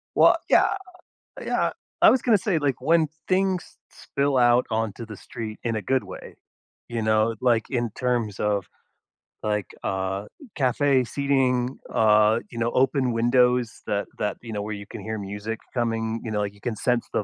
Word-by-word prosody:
Well, - - +6
yeah, - - +5 0.7
yeah, - - 0 0.3
I - - +9
was 255 - +3
gonna 225 -4 +4
say, 180 -4 0
like, 140 -3 0
when 160 +3 +3 0.2
things 190 -1 +1 0.3
s - - -21
spill 140 -1 0
out 120 0 +4
onto 110 +1 -2
the 105 -2 -9
street 110 -2 -7
in 115 -2 -1
a 110 - -2
good 130 +3 0
way, 95 - -10 0.5
you 115 -1 -3
know, 110 +1 +2
like, 120 -4 +2
in 120 -3 -1
terms 120 -5 -1
of, 105 -3 0 0.8
like, 105 -3 -1 0.2
uh, 95 +1 -2 0.3
cafe 135 -1 +2
seating, 130 -1 0 0.2
uh, 110 +1 +4
you 115 - -10
know, 115 +1 0
open 130 -1 +2
windows 125 0 +2
that 100 0 -1
that, 105 -1 -2
you 115 -2 -8
know, 105 -1 -3
where 105 0 -4
you 100 -1 -8
can - - -8
hear 110 +1 -4
music 105 +3 -5 0.2
coming 115 -1 -1
you 110 - -5
know, 105 - -1
like, 100 -1 -2
you 100 - -21
can 120 -3 -3
sense 120 +2 0
the 105 - +1
115 Hz, 180 wpm, -25 LUFS, 105-130 Hz, 0.8 s, I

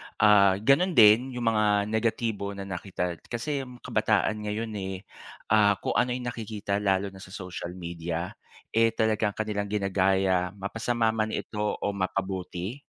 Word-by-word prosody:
Ah, 100 -3 +6
ganun 160 +9 +3
din 120 +4 +6
yung 120 - -3
mga 105 -1 +2
negatibo 110 -3 -1
na 100 - -6
nakita. 90 -2 -4
Kasi 135 +3 -3
ang 125 -1 -13
kabataan 110 -2 +1
ngayon 110 +2 -3
eh, 95 0 -5 0.5
ah, 105 -2 +5
kung - - -1
ano 125 0 +1
yung 125 -1 -3
nakikita 105 -3 -3
lalo 100 -1 +1
na 95 - -13
sa 95 0 -10
social 90 -1 -6
media, 85 -1 -4 0.4
eh 115 0 +3
talagang 110 -2 +1
kanilang 105 -2 -2
ginagaya, 95 -2 +1
mapasama 115 +3 0
man 110 0 -1
ito 105 - -5 0.2
o 100 - -1
mapabuti, 95 +3 -3
105 Hz, 150 wpm, -27 LUFS, 95-115 Hz, 0.5 s, Ah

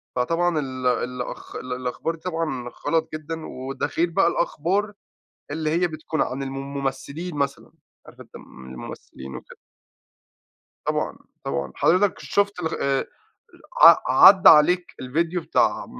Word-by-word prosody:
فطبعًا 165 +5 +1
ال 130 -2 -5
الأخ 125 0 -3
الأخبار 125 +5 -4
دي 160 - -20
طبعًا 160 -8 -3 0.2
غلَط 160 -1 +1
جدًا، 155 +1 -6
وده 130 +1 -5
غير 170 +1 +2
بقى 175 0 +2
الأخبار 190 +5 -1 0.6
اللي 155 +1 -2
هي 175 +3 +2
بتكون 155 0 -3
عن 135 +2 -3
المم 135 +1 -6
الممثِّلين 140 +5 -4
مثلًا، 140 -1 -3 0.3
عارِف، - - -15
أنتَ - - -15
المم 65 0 -12
الممثِّلين 65 +1 -10
وكده. - - -13 1.3
طبعًا، - - -1 0.3
طبعًا، 70 -1 -3
حضرتك 185 +3 +2
شُفت 200 -2 0
ال 160 -2 -3
آآ، 135 -1 0 0.8
ع - - +11 0.3
عدَّى 190 -1 +8
عليك 175 +4 +5
الفيديو 165 +7 -1
بتاع - - +1
155 Hz, 130 wpm, -23 LUFS, 130-170 Hz, 1.3 s, ع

